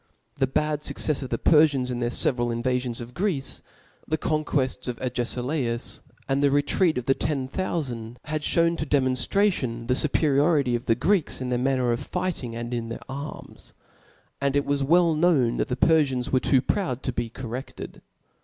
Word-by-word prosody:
The 135 - +2
bad 150 +3 0
fuccefs 150 -1 -1
of 130 - -5
the 115 - -1
Perfians 145 -5 +4
in 120 - -3
their 120 -1 0
feveral 120 0 +1
invafions 125 0 -1
of 120 +1 -9
Greece, 175 -7 -2 0.5
the 155 - 0
conquefts 145 -5 -1
of 125 -2 -3
Agefilaus, 125 0 -2 0.3
and 135 0 +1
the 145 - +4
retreat 145 +4 +2
of 125 - -3
the 135 - +4
ten 135 -2 -2
thoufand, 130 -9 -3
had 155 0 -2
Ihewa 170 +2 +2
to 155 - -1
demonftration 130 - +1
the 125 - +1
fuperiority 145 -1 +2
of 120 +2 -5
the 115 - +4
Greeks 175 - +1
in 130 -1 -3
their 120 - +1
manner 130 -1 +1
of 120 - 0
fighting 135 -11 -3
and 120 +1 -5
in 115 -1 -3
their 115 - -5
arms; 140 +3 -7 0.7
and 140 0 +1
it 145 - +2
was 140 0 0
well 165 +4 +4
known 150 -7 +3
that - - 0
the 125 - -1
Perfians 140 -5 +2
were 130 - +4
too 130 0 +2
proud 135 - -1
to 130 - -2
be 120 -1 -2
corredbed. 125 +2 -7
135 Hz, 180 wpm, -25 LUFS, 125-150 Hz, 0.7 s, Perfians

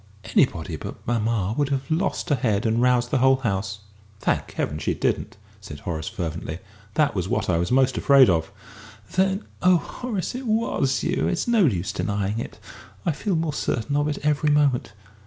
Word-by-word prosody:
Anybody - - +1
but - - -8
mamma 110 -3 0
would 145 0 +1
have 135 +1 -2
lost 180 +2 0
her 145 - +4
head 110 -6 0
and 115 +1 +2
roused 125 -1 +2
the 135 - +2
whole 130 +1 +5
house." 100 -5 -2 0.4
"Thank - - -1
Heaven 75 - -2
she 75 - -1
didn't!" - - -1 0.2
said 70 0 -10
Horace, 80 -3 -4
fervently. 80 -2 -4 0.4
"That 155 -2 +3
was 95 -1 -2
what - - 0
I 85 - +2
was 85 - -1
most 130 0 +3
afraid 140 -2 +6
of." 80 -3 +1 0.6
"Then 190 +2 +1 0.2
oh, 180 -1 +5
Horace, 210 +1 -4
it 255 0 -5
was 215 - +1
you! - - 0
It's 180 - -1
no 230 -5 +4
use 95 -3 -1
denying 100 +1 -2
it. - - -6 0.5
I 170 - +3
feel 185 +5 -2
more 160 -2 -1
certain 140 +3 -1
of 145 0 +2
it 150 - -2
every 150 0 +2
moment!" 145 -7 +2
130 Hz, 185 wpm, -24 LUFS, 100-150 Hz, 0.6 s, afraid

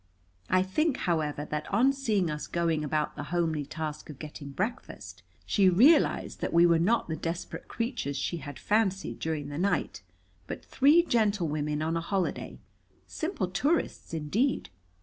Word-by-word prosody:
I 185 0 +4
think, 290 - 0
however, 150 -4 0
that 150 0 -3
on 265 +4 +4
seeing 215 - 0
us 150 0 -5
going 165 -3 0
about 150 0 -1
the 145 - -5
homely 160 -5 0
task 155 -1 -5
of 150 - -8
getting 150 -1 -8
breakfast, 215 - -5 0.2
she 195 -3 +4
realized 265 - +4
that - - -2
we 170 +1 +6
were 170 -1 +4
not 220 +8 +2
the 160 - -2
desperate 165 +2 -5
creatures 230 - -3
she 140 +5 -2
had 145 -4 -8
fancied 195 - 0
during 155 -3 -3
the 145 +2 -5
night, 200 +2 0 0.5
but - - -6
three 295 +6 +5
gentlewomen 165 - 0
on 160 +1 -1
a 165 - 0
holiday 190 +2 -2 0.5
simple 315 - -3
tourists, 280 - -1
indeed. 165 - 0
170 Hz, 155 wpm, -29 LUFS, 150-220 Hz, 0.5 s, we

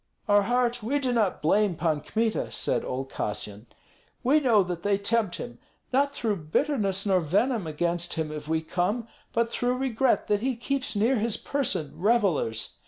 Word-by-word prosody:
"Our 205 0 +5
heart, 245 +2 +1
we 250 +7 0
do 260 -3 0
not 215 -9 +1
blame 200 +3 +3
Pan 155 -2 0
Kmita," 220 - -1
said - - -1
old 135 +1 -4
Kassyan. 105 +1 -4 0.6
"We 275 +5 +4
know 235 -8 +4
that 175 -2 -4
they 200 +1 +2
tempt 205 -1 0
him. 120 - -7 0.3
Not 280 +2 +3
through 220 -7 -1
bitterness 200 - +1
nor 190 -2 +3
venom 195 - +1
against 170 +2 -1
him 160 -2 -2
have 150 -1 -7
we 160 0 +1
come, 195 +8 -1 0.2
but 230 0 0
through 245 +1 0
regret 260 0 +1
that 205 0 +1
he 260 +1 0
keeps 260 +1 -2
near 230 +6 +3
his 225 0 -1
person 250 - -1
revellers. 180 - +1
205 Hz, 170 wpm, -27 LUFS, 170-245 Hz, 0.6 s, Our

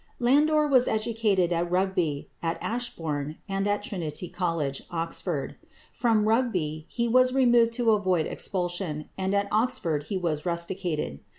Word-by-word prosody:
Landor 300 +5 +4
was 260 -4 +4
educated 215 -5 +1
at 170 +1 0
Rugby, 180 -5 0
at 165 0 -1
Ashbourne, 160 -11 -3
and 195 0 -1
at 205 0 0
Trinity 175 -3 -4
College, 165 -7 -2
Oxford. 165 -1 -3 0.4
From 220 -3 +2
Rugby 180 -10 0
he 235 -1 -1
was 255 +2 +4
removed 240 -3 +4
to 235 -1 +2
avoid 185 -6 +2
expulsion, 175 -4 -3
and 190 +1 -1
at 200 0 +1
Oxford 205 - 0
he 195 - -2
was 160 -5 -1
rusticated. 170 - -2
190 Hz, 135 wpm, -27 LUFS, 165-230 Hz, 0.4 s, Landor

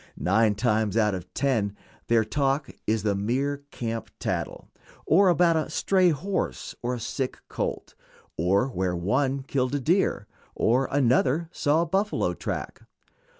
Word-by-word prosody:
Nine 105 +3 +2
times 110 -2 +1
out 105 -2 +3
of 90 -1 -6
ten 110 -8 0 0.3
their 115 -2 +3
talk 135 +4 0 0.2
is 110 -1 +1
the 105 -2 +1
merest 140 +8 -2
camp 115 -3 -4
tattle, - - -3 0.4
or 190 +4 +5
about 175 -1 +4
a 160 -1 0
stray 185 +3 +3
horse 185 +6 -2
or 125 +1 -2
sick 125 +3 -3
colt, - - -4 0.4
or 95 +8 +2
where 95 -6 -1
one 130 +10 0
killed 130 0 -1
a - - 0
deer 165 - +1 0.3
or 125 +4 +2
another 140 +4 +2
saw 150 +3 +2
a - - -2
buffalo 200 +4 0
track. - - -5
130 Hz, 145 wpm, -26 LUFS, 110-145 Hz, 0.4 s, or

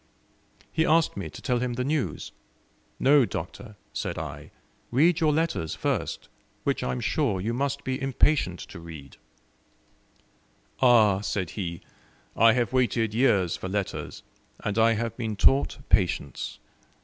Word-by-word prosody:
He 160 - +1
asked 165 0 +3
me 95 -5 -5
to - - -12
tell 125 -1 +1
him 125 0 -2
the 125 +1 -2
news. 145 +1 -2 0.7
"No, 140 +1 +5
Doctor," 105 +2 -6 0.2
said - - -3
I, 75 -2 -6 0.4
"read 160 +7 +3
your 155 -2 +3
letters 150 - -1
first, - - -2 0.4
which - - 0
I 65 - -1
am 65 - -3
sure 125 -11 0
you 110 +5 -2
must 140 +2 -2
be 130 0 -3
impatient 135 - +1
to - - -10
read." 80 -5 -11 1.6
"Ah," 110 -6 +5
said 95 -4 -2
he, 85 -5 -5 0.5
"I 115 0 +6
have 120 +1 0
waited 120 -4 +1
years 100 -8 +2
for 95 - -6
letters, 100 0 -4 0.4
and 105 +1 -1
I 115 +1 +5
have 115 0 -2
been 110 -3 -3
taught 70 -3 +3
patience. - - 0
115 Hz, 145 wpm, -26 LUFS, 90-130 Hz, 1.6 s, I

